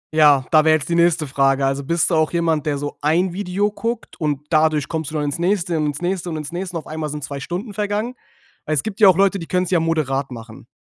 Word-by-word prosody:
Ja, 145 -4 +5
da 155 -1 +6
wäre 160 0 +5
jetzt 145 +2 -8
die - - 0
nächste 170 -2 +3
Frage. 135 0 +2
Also 135 +1 -1
bist 170 +4 0
du - - +3
auch 155 -1 +2
jemand, 165 -3 0
der 145 -1 0
so 145 +1 -5
ein 170 +4 +1
Video 200 +2 -1
guckt? 230 +2 -4
Und 145 -2 -1
dadurch 155 -2 +2
kommst 160 -2 -3
du 155 - -7
dann 150 - 0
ins 145 +3 -3
nächste 175 -2 0
und 150 -1 0
ins 150 +4 -4
nächste 180 -1 -2
und 160 - -4
ins 150 +1 -6
nächste, 180 -1 -4
und - - -4
auf - - -14
einmal 155 -1 -4
sind 150 -1 -6
2 140 0 -5
Stunden 185 - -5
vergangen? 210 +4 -2 0.5
Weil 155 - 0
es 140 - 0
gibt 215 -1 -6
ja 205 - +8
auch 185 -1 +6
Leute, 195 0 +3
die 165 - -7
können's 180 0 -1
ja 175 - +4
moderat 145 -5 -1
machen. 115 -2 -10
160 Hz, 265 wpm, -20 LUFS, 145-180 Hz, 0.5 s, ja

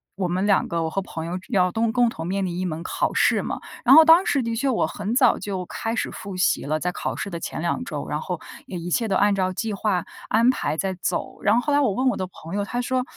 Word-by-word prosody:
我 190 -1 -1
们 185 +3 -1
两 200 -2 +3
个 170 -1 -1
我 160 - -1
和 195 +5 -2
朋 165 -4 -6
友 175 +2 -4
要 180 -5 +2
都 225 +2 0
共 245 0 +3
同 165 -6 -6
面 195 +1 -1
临 175 -1 -3
一 - - -1
门 165 -1 -4
考 - - -1
试 - - +3
嘛， - - -4 0.2
然 265 +3 +7
后 320 0 +9
当 330 +3 +7
时 275 -3 +1
的 230 0 -2
确 270 +4 0
我 240 - +1
很 205 +3 -3
早 255 -3 +4
就 190 -3 -4
开 225 +5 -3
始 - - -2
复 195 -2 -7
习 180 - +2
了， 155 +2 -1
在 180 - -1
考 - - -4
试 200 - -4
的 170 - -4
前 - - -5
两 175 +8 -1
周， - - -5
然 - - -2
后 - - -4 0.3
也 185 - -5
一 175 +1 -5
切 225 +5 +1
都 195 - 0
按 205 +1 +4
照 185 -1 0
计 215 +3 -3
划 195 -3 0 0.2
安 230 +3 +3
排 160 - -2
在 190 +2 -1
走。 - - -3
然 210 +2 +3
后 240 - +3
后 290 +1 -1
来 290 - +4
我 255 -9 +2
问 260 +5 0
我 - - 0
的 185 - -3
朋 170 -2 -11
友， 205 - 0
他 240 +4 -3
说 255 +1 0
200 Hz, 305 characters per minute, -23 LUFS, 180-235 Hz, 0.3 s, 后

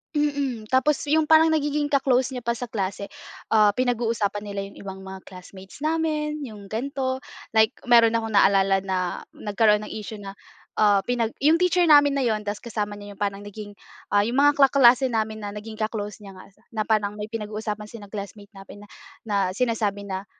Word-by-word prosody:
Mm, 285 -6 -1
tapos 270 +3 +3
yung 305 +1 +2
parang 320 0 +6
nagiging 295 -1 0
ka-close 265 -2 +1
niya 250 - -5
pa 235 0 -2
sa 245 - -4
klase, 200 -3 -4 0.5
ah, 215 -1 +6
pinag-uusapan 230 -4 0
nila 200 -1 -5
yung 200 - -13
ibang 190 -1 -8
mga 190 0 -9
classmates 190 +7 -11
namin, 305 -1 -1
yung 215 -7 -8
gan’to. 260 +4 -3 0.3
Like 220 +2 +3
meron 230 -2 +5
akong 225 -1 -4
naalala 195 -1 +4
na 190 -1 -2 0.4
nagkaroon 210 0 +2
ng - - -8
issue 215 0 -7
na, 200 -1 -8 0.5
ah, 205 -2 +4
pinag 235 -2 -1
yung 315 +5 +3
teacher 360 -1 +3
namin 290 -3 +6
na 270 - +1
‘yon 215 -2 0
tas 205 0 -4
kasama 210 -3 -4
niya 205 0 -10
yung 200 - -22
parang 200 0 -2
naging, 205 0 -9 0.3
ah, 205 0 +3
yung 235 - -2
mga 290 0 +4
kaklase 265 -2 +5
namin 220 -1 -2
na 205 - -5
naging 215 +1 -8
ka-close 215 -2 -3
niya 195 - -10
nga 185 +1 -14 0.2
na 215 - -1
parang 210 -2 +1
may 210 +1 -7
pinag-uusapan 215 -1 -5
sa 210 -2 -11
classmate 200 0 -8
namin 195 +1 -12
na 205 - -13 0.4
na 205 - 0 0.2
sinasabi 210 -3 -1
na 190 +1 -4
220 Hz, 185 wpm, -24 LUFS, 205-260 Hz, 0.5 s, parang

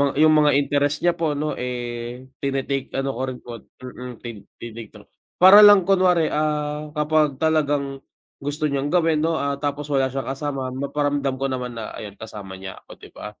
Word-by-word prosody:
yung 155 +1 +5
mga 150 -2 +4
interest 145 +2 +1
niya 175 - +4
po 155 -3 0
no 150 +1 -3
eh 120 0 -5 0.2
tinitake 135 0 -2
ano 135 0 -1
ko 130 -1 -6
rin 130 -1 -5
po 120 - -9 0.3
hmm 125 -1 -8
tin 115 -3 -7 0.2
tinto 115 -2 -11 0.2
para 190 +3 +9
lang 205 -2 +8
kunwari, 180 -4 +3
ah, 150 0 -1
kapag 150 -1 +2
talagang 145 -3 0 0.4
gusto 145 +2 -4
niyang 140 +1 -1
gawin 165 -2 +2
no 165 +1 +1
ah 140 -2 -2
tapos 145 0 -3
wala 135 -1 +2
siyang 135 +1 -4
kasama 135 -2 -4
maparamdam 140 0 -1
ko 135 +1 -2
naman 125 -2 -4
na 110 -2 -6
ayun 100 -1 -8
kasama 105 -4 -9
niya 95 0 -9
ako - - -15
di - - -15
ba? - - -9
140 Hz, 180 wpm, -22 LUFS, 125-150 Hz, 0.4 s, para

